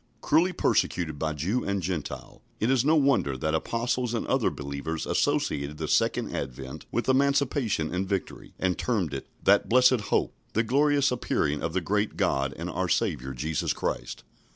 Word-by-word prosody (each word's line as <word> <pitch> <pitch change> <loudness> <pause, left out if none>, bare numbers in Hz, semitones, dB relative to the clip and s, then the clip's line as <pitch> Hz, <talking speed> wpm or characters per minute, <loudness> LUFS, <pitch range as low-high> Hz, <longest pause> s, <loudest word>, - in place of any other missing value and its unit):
Cruelly 170 +5 +3
persecuted 85 - 0
by 80 -1 -1
Jew 95 - -1
and 100 0 -1
Gentile, 90 -4 -5 0.2
it 115 +4 +2
is 130 -2 +3
no 155 +3 +4
wonder 135 - +2
that 80 +4 -1
Apostles 120 +7 -1
and 115 - -2
other - - +2
believers 70 +3 -4
associated 70 +2 0
the - - -3
second - - +1
advent 65 0 -6
with - - -1
emancipation 135 - +1
and 95 +1 -2
victory, 100 -2 -4
and 90 -3 0
termed 100 - 0
it 70 - -5 0.2
"That - - +4
blessed 125 -2 +4
hope, - - +1 0.2
the 115 - +2
glorious 140 +3 +3
appearing 75 - 0
of 80 - -2
the 95 - 0
great 105 +5 -1
God 70 0 +1
and - - -4
our - - -2
Saviour 65 +1 0
Jesus 75 +4 -1
Christ." - - -4
95 Hz, 170 wpm, -27 LUFS, 75-125 Hz, 0.2 s, no